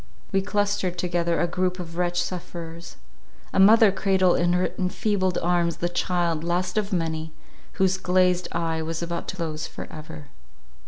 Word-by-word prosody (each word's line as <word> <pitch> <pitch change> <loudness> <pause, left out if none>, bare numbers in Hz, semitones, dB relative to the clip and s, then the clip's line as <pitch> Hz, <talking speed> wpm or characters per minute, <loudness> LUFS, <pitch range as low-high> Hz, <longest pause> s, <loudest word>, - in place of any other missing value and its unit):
We 195 -1 +2
clustered 205 -3 -1
together 170 -1 0
a - - +3
group 180 +1 -1
of 165 -2 -7
wretched 175 0 0
sufferers. 170 -2 -7 0.6
A - - +2
mother 215 +2 +7
cradled 190 -2 +2
in 175 0 +2
her 180 +1 +1
enfeebled 185 0 0
arms 170 -1 +1
the 175 - -1
child, 175 -3 0
last 180 +2 -1
of 210 -1 0
many, 160 -3 -2 0.4
whose 190 -1 +2
glazed 180 -1 +2
eye 165 -1 -1
was 165 +1 -3
about 170 0 -4
to - - -4
close 160 -3 -3
for - - -8
ever. 155 -1 -9
175 Hz, 160 wpm, -25 LUFS, 170-185 Hz, 0.6 s, mother